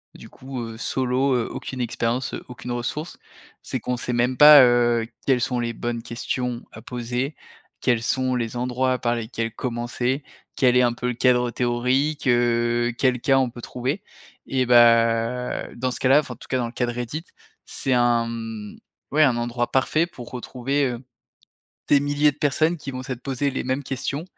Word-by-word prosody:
du - - -12
coup, 130 -1 -7
heu, 115 -1 -7
solo, 130 +2 0
heu, 120 -2 0
aucune 130 -2 -6
expérience, 120 +2 -2
heu, - - -8
aucune 125 0 -7
ressource, 120 +7 -4 0.5
c'est - - -3
qu'on 125 0 -2
sait 125 - -3
même 120 +2 +1
pas, 150 -1 +10
heu, 120 -2 +3 0.2
quelles 130 -3 +3
sont 125 0 0
les 115 -1 -2
bonnes 120 0 -4
questions 125 0 -3
à - - -11
poser? 125 +4 -3 0.5
Quels 120 -3 +1
sont 130 +1 0
les 120 -1 -3
endroits 125 +1 0
par 120 0 0
lesquels 115 0 -3
commencer? 120 +2 -2 0.3
Quel 125 -1 +4
est 125 - +5
un 120 -1 +2
peu 125 - -4
le 125 - 0
cadre 125 -1 +3
théorique, 130 +5 0
heu? 120 -1 +2
Quel 130 -1 +2
cas 135 -1 +4
on 130 -2 +1
peut 120 - -10
trouver? 130 - -3 0.4
Et 130 -1 +1
bah, 115 0 +3
dans 130 +2 -1
ce - - -5
cas-là, 135 +3 +5
enfin, 150 - -4
en - - -24
tout - - -14
cas, 130 - +1
dans 120 - -1
le 115 - -8
cas 125 - 0
de - - -1
Reddit, 125 +7 -5 0.4
c'est 130 - -2
un 120 -1 +3
mmh, 115 -2 -6 0.3
ouais, 155 +2 +4
un 130 -5 +4
endroit 120 0 -2
parfait 155 +5 +2
pour 125 -8 -11
retrouver, 130 +3 -2
heu, 120 0 -5 0.9
des 145 - +5
milliers 145 +1 +2
de 145 - -25
personnes 155 +4 +1
qui 140 -2 -6
vont 130 0 -5
s'être 130 -2 -6
posées 140 +1 -1
les - - -2
mêmes 130 +2 -2
questions 140 +4 -3
125 Hz, 190 wpm, -23 LUFS, 120-135 Hz, 0.9 s, pas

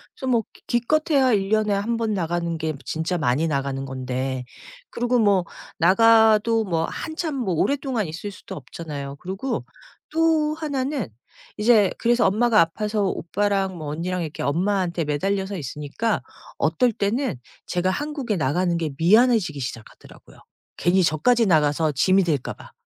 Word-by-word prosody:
그래서 265 - -6
뭐 235 -3 +2
기 - - -20
기껏해야 270 +1 +2
1 195 -2 0
년에 215 -1 +2
1 210 +4 -1
번 225 -2 -1
나가는 170 -2 -2
게 160 0 -2
진짜 165 +3 -2
많이 150 +1 +1
나가는 135 -2 -2
건데 130 0 -3 0.4
그리고 245 +1 0
뭐 200 -5 +3 0.3
나가도 220 +4 +5
뭐 165 -4 0
한참 315 - -4
뭐 235 -9 -1
오랫동안 265 - 0
있을 180 +6 -6
수도 190 - -10
없잖아요. 145 -1 -7
그리고 195 +9 -4 0.4
또 315 -1 +2
1 295 -5 -2
는 270 - -2 0.5
이제 210 -3 +4
그래서 240 +1 +3
엄마가 220 +3 +3
아파서 210 +5 -1
오빠랑 195 +1 -1
뭐 155 - -6
언니랑 175 +4 -2
이렇게 155 -2 -5
엄마한테 175 +2 0
매달려서 195 +7 -1
있으니까 150 - -3 0.4
어떨 250 -2 +2
때는 210 - -1 0.3
제가 180 +1 0
한국에 285 -3 -3
나가는 175 +3 0
게 165 -2 -2
미안해지기 210 - +3
시작하더라고요. 120 -3 -9 0.4
괜히 185 +2 +3
저까지 225 +10 +3
나가서 155 -3 +2
짐이 190 +8 +3
될까 150 -7 -1
봐. - - -15
195 Hz, 325 characters per minute, -23 LUFS, 160-230 Hz, 0.5 s, 나가도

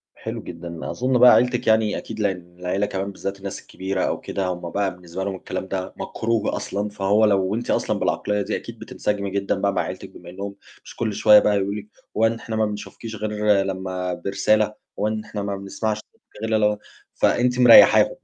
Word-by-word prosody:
حلو - - -6
جدًا. 85 0 -7
أظن 130 +1 +1
بقى 125 0 +9
عيلتِك 125 0 +2
يعني 110 -1 +3
أكيد 110 0 -7
لإن 90 -4 -2
العيلة 90 +3 0
كمان 100 0 -3
بالذات 100 0 -5
الناس 100 0 -6
الكبيرة 95 0 -4
أو - - -1
كده، 95 -1 -3
هُم 90 -1 -4
بقى 100 +1 -1
بالنسبة 90 +1 -6
لهم 95 0 -3
الكلام 95 - -5
ده 95 -1 -4
مكروه 115 -1 -1
أصلًا، 100 +1 -3
فهو 105 +1 +2
لو 100 -1 +2
أنتِ 120 +1 -2
أصلًا - - 0
بالعقلية 105 0 0
دي - - -2
أكيد - - -8
بتنسجمي 100 -1 -3
جدًا 100 0 -1
بقى 100 0 0
مع - - +1
عيلتك، 95 +1 -6
بما 90 -2 -13
إنهم 100 +2 -6 0.3
مش - - -12
كل 110 -2 -2
شوية 105 +1 +7
بقى 105 0 +2
يقولوا 100 +1 -1
لِك 105 -1 -7 0.3
هو 110 +1 +5
إحنا 115 0 -4
ما 110 0 +2
بنشوفكيش 105 +2 -6
غير 105 -2 +1
لما 95 -1 -3
برسالة، 100 +4 +1 0.3
هو 105 - +1
ان 110 0 -2
إحنا 105 -1 -5
ما 100 0 -2
بنسمعش 100 +2 -3
صوتك 110 - -16
إلا 110 0 +1
لو 105 -1 +2 0.4
فأنتِ 125 +1 +2
مريحاهم 125 - +8
100 Hz, 195 wpm, -23 LUFS, 95-110 Hz, 0.4 s, بقى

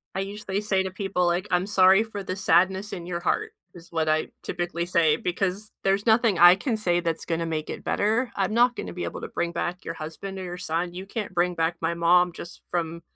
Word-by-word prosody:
I - - -1
usually 200 0 -3
say 195 -2 +1
to 190 - -4
people, 190 -1 -1
like, 175 +3 0
"I'm 180 +1 +2
sorry 190 0 +5
for 215 -3 -7
the 185 -1 -4
sadness 190 +1 +2
in 175 -2 -6
your 175 -1 -3
heart," 430 - -1 0.2
is 170 -1 -14
what 160 -2 0
I 155 0 +1 0.2
typically 175 -1 -3
say, 165 -3 +3
because 190 +5 -2
there's 195 +1 +1
nothing 225 -3 +4
I 175 +1 +9
can 225 +3 -2
say 175 -5 +1
that's 165 -2 -2
gonna 165 0 -1
make 155 -1 -3
it - - -6
better. 225 +4 0
I'm 195 +1 0
not 240 +1 +4
gonna - - -6
be 175 - -4
able - - -6
to - - -5
bring 170 - -2
back 175 +1 -3
your 165 - -5
husband 165 +6 -7
or - - -5
your 180 -1 -6
son. 175 +1 -2
You 185 +2 -7
can't 210 -2 -5
bring 175 0 +1
back 165 +1 0
my 165 +1 0
mom 175 +1 +4
just 170 0 -10
from 170 -1 -2
180 Hz, 235 wpm, -25 LUFS, 170-195 Hz, 0.2 s, I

